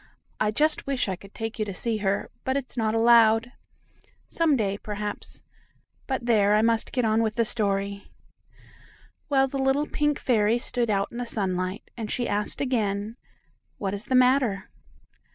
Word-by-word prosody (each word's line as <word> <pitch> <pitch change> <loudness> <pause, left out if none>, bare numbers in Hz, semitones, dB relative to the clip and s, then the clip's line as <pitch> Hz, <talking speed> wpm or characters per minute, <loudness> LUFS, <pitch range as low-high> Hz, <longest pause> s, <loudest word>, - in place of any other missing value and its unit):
I 215 - +2
just 300 +8 +1
wish 275 -4 0
I 190 - -1
could 200 +2 -16
take 225 0 -5
you 215 - 0
to 200 -2 -6
see 230 +3 0
her, 200 -1 -1
but 260 +1 0
it's 270 -2 -6
not 220 -2 0
allowed. 225 0 +5 0.8
Some 325 -3 +2
day, 200 -3 -1
perhaps 210 0 -5 0.6
but 260 -3 -2
there, 210 -3 +4
I 215 - +3
must 230 0 +1
get 250 -3 0
on 220 +1 +2
with 220 -1 -1
the 230 -1 +2
story. 200 -2 -1 1.2
Well, 270 -2 +3
the 275 +1 -4
little 270 +2 +2
pink 295 -1 0
fairy 225 -2 +2
stood 240 -1 -1
out 200 -1 0
in 235 - -8
the 245 - -2
sunlight, 185 -3 -2
and 225 -3 -5
she 245 - -1
asked 205 +1 +1
again: 215 -5 -1 0.6
"What 195 -1 -3
is 205 +2 -5
the 260 - 0
matter?" 250 -6 +3
225 Hz, 170 wpm, -26 LUFS, 205-250 Hz, 1.2 s, allowed